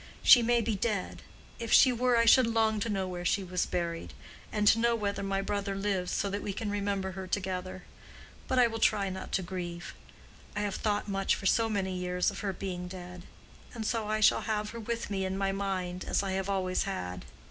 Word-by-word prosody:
She 245 - +9
may 235 0 +3
be 225 0 -1
dead. 205 -1 -2 0.4
If 230 -1 -4
she 255 - +7
were 245 0 +2
I 230 - +4
should 250 +1 +6
long 220 -1 +2
to 225 - -2
know 195 -3 -1
where 180 -1 -5
she 190 +3 +1
was 180 -1 -1
buried; 170 -1 -3 0.4
and 210 -1 0
to 225 - +4
know 235 0 +3
whether 200 -3 -2
my 195 0 -1
brother 200 0 -2
lives, 195 -2 -1
to - - 0
say - - +1
Kaddish 200 0 -3
in 205 -2 -2
memory 195 -1 -1
of 190 -1 -2
her. 185 -2 -5 0.6
But 260 - 0
I 250 - +7
will 225 -1 -2
try 200 -3 +2
not 190 0 -7
to 190 - +1
grieve. 175 -1 -6 0.6
I 210 - -1
have 205 -1 -1
thought 210 -1 -1
much 195 -1 +1
for - - -8
so 225 +3 +3
many 190 -3 -1
years 180 +1 0
of 200 - -8
her 200 -2 -2
being 180 -2 -5
dead. 180 -1 -9 0.5
And 220 -2 -3
I 215 -1 -1
shall - - +5
have 210 -1 -2
her 230 - -7
with 230 -1 -4
me 195 -1 -1
in 190 0 -2
my 195 0 0
mind, 185 -2 -3
as - - 0
I 195 - -2
have 190 +1 -2
always 185 -2 0
had. 90 - -4
200 Hz, 220 wpm, -30 LUFS, 185-215 Hz, 0.6 s, She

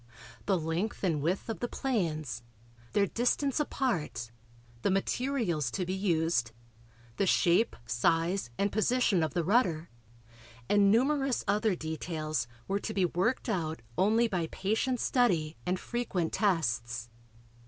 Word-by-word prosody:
The 195 -2 +3
length 165 +7 -2
and 165 -6 +1
width 175 +6 -1
of 225 - -4
the 240 - -1
planes, 155 - -2 0.5
their 200 -1 +4
distance 250 - +1
apart, 165 - -1 0.5
the - - +1
materials 195 - 0
to 185 +7 -2
be 185 - -2
used, 165 - +1 0.6
the 195 - +1
shape, 180 +6 +3
size 165 - +1
and 200 0 +1
position 215 -3 +2
of 155 -3 -1
the 170 - +1
rudder 175 -5 +1 0.8
and 205 -1 +4
numerous 270 +4 +2
other 210 0 +2
details 155 -4 -3 0.2
were 195 +1 0
to 215 - -5
be 190 -2 +3
worked 185 +11 0
out 165 - -2
only 220 +5 +3
by 180 -6 -1
patient 220 +8 -1
study 170 - +2
and 180 +1 0
frequent 205 -9 -2
tests. 120 - 0
185 Hz, 130 wpm, -30 LUFS, 160-220 Hz, 0.8 s, their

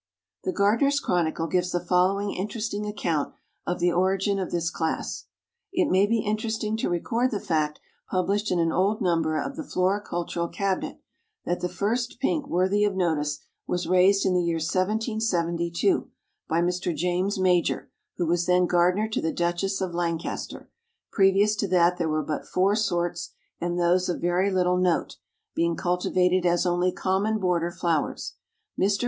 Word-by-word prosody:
The - - +1
Gardener's 230 +9 +2
Chronicle 165 - 0
gives 180 +2 0
the 175 - 0
following 185 +3 +1
interesting 210 +1 -3
account 170 -8 -2 0.3
of 175 - 0
the 175 0 +2
origin 190 +3 +1
of 185 - -3
this 170 -1 -1
class: 160 -1 -3 0.5
"It 370 -4 +1
may 190 +2 +4
be 225 0 +1
interesting 215 +1 -2
to - - -1
record 230 +8 0
the 210 - -2
fact, 155 -7 -1 0.3
published 200 +3 0
in 180 - +1
an 165 -1 +2
old 200 +5 +1
number 165 -4 +1
of 275 - -4
the 320 - -4
Floricultural 180 - -1
Cabinet, 195 -2 -2 0.5
that 175 - -1
the 180 - -1
first 240 +7 -2
Pink 295 +2 0
worthy 190 +4 +2
of 205 -2 +1
notice 150 -5 0 0.3
was 175 -1 -1
raised 185 +2 +4
in 190 - +2
the 180 - +3
year 170 -1 0
1772, 185 - 0 0.4
by 165 +1 +2
Mr. 180 -1 -1
JAMES 180 +5 0
MAJOR 180 -2 +1 0.3
who 175 - 0
was 170 +1 +1
then 180 0 +4
gardener 180 +4 +2
to 215 - -2
the 160 - 0
duchess 175 +3 -1
of 185 -2 -2
Lancaster; 170 -1 -3 0.4
previous 200 +2 +4
to 205 - 0
that 180 -1 +3
there 165 -2 0
were 155 0 0
but 150 +1 -4
four 195 +3 +2
sorts, 175 -5 -1 0.3
and 175 +1 -2
those 175 +1 +2
of 175 - -1
very 175 +3 +1
little 180 -1 +2
note, 180 -2 0 0.4
being 170 0 +1
cultivated 180 +1 +1
as 175 0 +2
only 175 +1 +2
common 195 +5 0
border 180 -4 0
flowers. 170 -3 -2 0.5
Mr. 200 +1 +2
180 Hz, 165 wpm, -26 LUFS, 175-200 Hz, 0.5 s, may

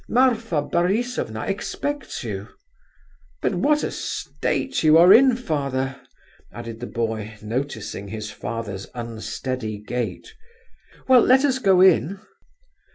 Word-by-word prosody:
Marfa 225 - +2
Borisovna 180 - -1
expects 285 - -4
you. 105 -3 -5 0.9
But - - 0
what 295 +12 +2
a - - -2
state 270 -8 -2
you 155 0 +6
are 175 +3 +8
in, 255 +2 +6
father!" 140 - -2 0.6
added 115 +1 -8
the 120 - -5
boy, 110 -2 -3
noticing 110 -3 -4
his 110 0 -6
father's 105 -5 -5
unsteady 115 0 -4
gait. 120 - -5 0.7
"Well, 255 -2 +7
let 260 +4 +5
us 260 -2 +1
go 190 -6 +4
in." 190 0 +4
140 Hz, 115 wpm, -23 LUFS, -, 0.9 s, are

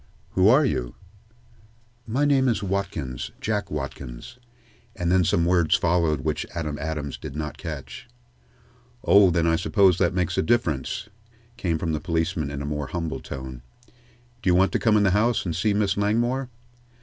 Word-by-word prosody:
"Who 95 +1 +3
are 135 +7 +6
you?" - - -2 1.1
"My 130 +6 +1
name 135 -2 +3
is 115 -4 0
Watkins 95 -10 -3
Jack 105 -1 -2
Watkins," 70 - -7 0.6
and 90 -2 -1
then 95 0 +4
some 85 0 +2
words 85 -2 +3
followed 80 -4 +1
which 75 +1 -1
Adam 75 -3 -3
Adams 75 -3 -4
did 70 - -8
not 75 0 -5
catch. - - -7 1.0
"Oh, 100 -5 +6
then 85 -1 +1
I 80 0 +3
suppose 95 -1 +3
that 90 -1 +2
makes 90 -1 0
a - - +4
difference," 100 - 0 0.5
came 90 -9 -1
from 80 +1 -2
the 75 - -1
policeman 80 -2 -1
in 70 0 -5
a - - -4
more 75 -1 -3
humble 85 -1 -3
tone. 65 -2 -8 0.8
"Do 95 - +1
you 90 - +4
want 95 +2 +4
to - - 0
come 110 -2 +3
in 105 - +3
the 95 - +3
house 110 +4 +2
and 85 -3 -2
see 95 +5 +1
Miss 100 -1 +1
Langmore?" 120 +6 0
90 Hz, 175 wpm, -24 LUFS, 75-105 Hz, 1.1 s, are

